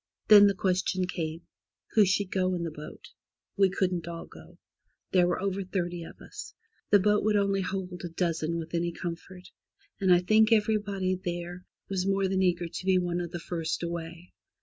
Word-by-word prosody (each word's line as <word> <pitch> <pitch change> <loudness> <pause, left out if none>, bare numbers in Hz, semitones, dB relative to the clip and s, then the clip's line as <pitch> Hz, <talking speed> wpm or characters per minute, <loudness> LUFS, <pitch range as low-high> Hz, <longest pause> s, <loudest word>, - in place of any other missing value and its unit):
Then 205 -1 +10
the 200 - +1
question 185 0 0
came: 165 -2 -4 0.5
Who 215 -2 +5
should 195 0 0
go 185 -1 +1
in 170 - -3
the 165 - -3
boat? 150 0 -10 0.5
We 195 -1 +4
couldn't 180 -3 -1
all 170 -1 -6
go. - - -15 0.5
There 180 -2 +4
were 175 - 0
over 195 0 -2
thirty 175 -2 -3
of - - -13
us. 425 0 -10 0.3
The 205 - +7
boat 210 +2 +2
would 215 0 +2
only 200 -1 +2
hold 185 -1 -4
a 175 - -4
dozen 165 -1 -1
with 165 0 -6
any 170 0 0
comfort, 175 +2 -7 0.5
and 190 -2 +3
I 175 0 +6
think 215 +4 +4
everybody 205 -3 +1
there 175 +1 -5 0.2
was 190 -1 -1
more 195 0 +2
than 190 0 0
eager 175 -2 +1
to 175 - -7
be 190 -1 +5
one 175 -1 -1
of 175 - -4
the 175 - -5
first 165 -1 -3
away. 170 +1 -6
180 Hz, 190 wpm, -28 LUFS, 170-195 Hz, 0.5 s, Then